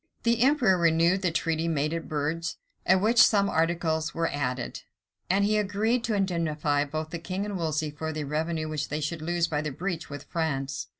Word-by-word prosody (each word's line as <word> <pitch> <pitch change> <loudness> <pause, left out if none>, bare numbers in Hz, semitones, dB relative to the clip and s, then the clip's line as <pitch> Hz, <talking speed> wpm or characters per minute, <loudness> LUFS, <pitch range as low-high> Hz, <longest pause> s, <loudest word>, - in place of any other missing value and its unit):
The 235 -1 +2
emperor 250 -9 +4
renewed 170 +3 +3
the 185 - +2
treaty 165 0 -1
made 155 -1 0
at 165 -1 -4
Bruges, 155 +2 -2 0.3
to 190 - +8
which 220 +5 +4
some 200 -2 +5
articles 165 -2 0
were 165 0 0
added; 125 -3 -3 0.5
and 195 +2 +3
he 215 +1 +2
agreed 215 +4 0
to 220 - 0
indemnify 155 -6 0
both 155 +2 -4
the 170 - -4
king 185 +4 -3
and 205 -1 -4
Wolsey 155 -3 -1
for 160 +2 -4
the 155 -1 -3
revenue 155 +2 -2
which 155 -2 -3
they 150 - -2
should 155 +2 -3
lose 170 +1 0
by 150 -3 -1
a 150 0 -3
breach 175 +3 -4
with 145 0 -7
France. 135 -5 -2
165 Hz, 195 wpm, -27 LUFS, 155-190 Hz, 0.5 s, to